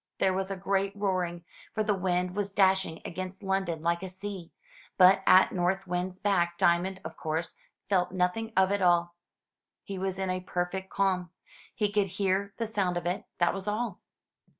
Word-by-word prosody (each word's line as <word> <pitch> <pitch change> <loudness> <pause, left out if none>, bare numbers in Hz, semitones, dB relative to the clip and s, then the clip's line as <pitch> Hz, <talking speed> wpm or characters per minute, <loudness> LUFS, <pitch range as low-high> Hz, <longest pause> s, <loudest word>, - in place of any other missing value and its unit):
There 190 - +2
was 190 +1 -2
a 195 - -2
great 195 +1 -1
roaring, 185 -4 -1 0.3
for 215 - +1
the 210 - +2
wind 180 -1 -1
was 200 -1 -1
dashing 190 -4 +2
against 185 +3 -6
London 190 -4 -1
like 170 +1 +1
a 190 - -5
sea; 190 -2 -7 0.5
but 190 +1 +7
at 185 +1 +7
North 190 +2 0
Wind's 180 +1 -3
back 175 -4 +1
Diamond, 180 +3 +2
of 160 0 -6
course, 160 +1 -3 0.3
felt 180 -3 +1
nothing 185 +5 0
of 190 0 +4
it 200 0 0
all. 175 -1 +3 0.7
He 195 -2 -6
was 190 0 -2
in 190 -1 -1
a 185 - -1
perfect 185 +1 -3
calm. 185 -2 0 0.5
He 210 -3 0
could 205 -1 +2
hear 200 0 +1
the 230 - -1
sound 200 -5 0
of 175 - -4
it, 180 +2 -2
that 175 - +2
was 195 +1 -6
all. 215 -1 -2
190 Hz, 180 wpm, -29 LUFS, 180-195 Hz, 0.7 s, but